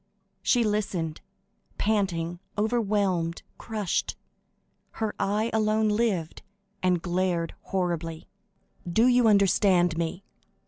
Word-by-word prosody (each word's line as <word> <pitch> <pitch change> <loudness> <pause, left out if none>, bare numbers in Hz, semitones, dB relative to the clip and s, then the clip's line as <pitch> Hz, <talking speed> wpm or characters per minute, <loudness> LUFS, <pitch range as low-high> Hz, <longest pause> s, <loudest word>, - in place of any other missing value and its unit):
She 245 -2 +3
listened, 195 -7 -2 0.6
panting, 175 -5 0 0.2
overwhelmed, 205 -6 0 0.2
crushed; 215 -5 -2 0.8
her 220 -2 -2
eye 210 +3 0
alone 215 0 +2
lived, 210 -7 0 0.4
and 180 -2 +1
glared 175 -2 0
horribly. 170 -3 -2 0.6
"Do 225 +7 +4
you 250 -2 +5
understand 190 -4 +4
me?" 170 +3 -3
195 Hz, 90 wpm, -27 LUFS, 175-215 Hz, 0.8 s, you